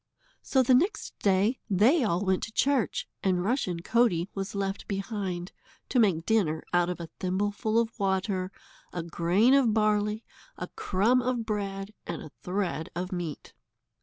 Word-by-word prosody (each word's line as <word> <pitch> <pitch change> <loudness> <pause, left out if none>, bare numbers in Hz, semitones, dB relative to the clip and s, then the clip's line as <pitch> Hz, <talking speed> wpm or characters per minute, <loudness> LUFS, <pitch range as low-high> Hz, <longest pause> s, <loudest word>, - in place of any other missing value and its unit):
So 265 -1 +2
the 255 - +4
next 355 - +1
day 200 +5 +2
they 230 - +4
all 195 -2 0
went 190 -1 +2
to 225 - -11
church, 270 0 +1
and 180 -2 +1
Rushen 195 -8 0
Coatie 200 -7 +2
was 195 +1 -4
left 195 0 -3
behind, 195 -3 -3 0.4
to 255 - +2
make 180 -7 +3
dinner 180 -9 +1
out 175 0 +3
of 180 - -4
a 170 -1 -6
thimbleful 205 +4 0
of 230 0 0
water, 190 -1 0 0.4
a 175 - -4
grain 175 +9 +3
of 250 -6 +4
barley, 210 0 +1 0.3
a - - -5
crumb 220 +7 +2
of 245 -2 -1
bread, 200 -1 -3
and 170 - -4
a 155 - -10
thread 180 -4 -2
of 180 +1 -3
meat. 175 -5 -5
200 Hz, 160 wpm, -28 LUFS, 180-225 Hz, 0.4 s, the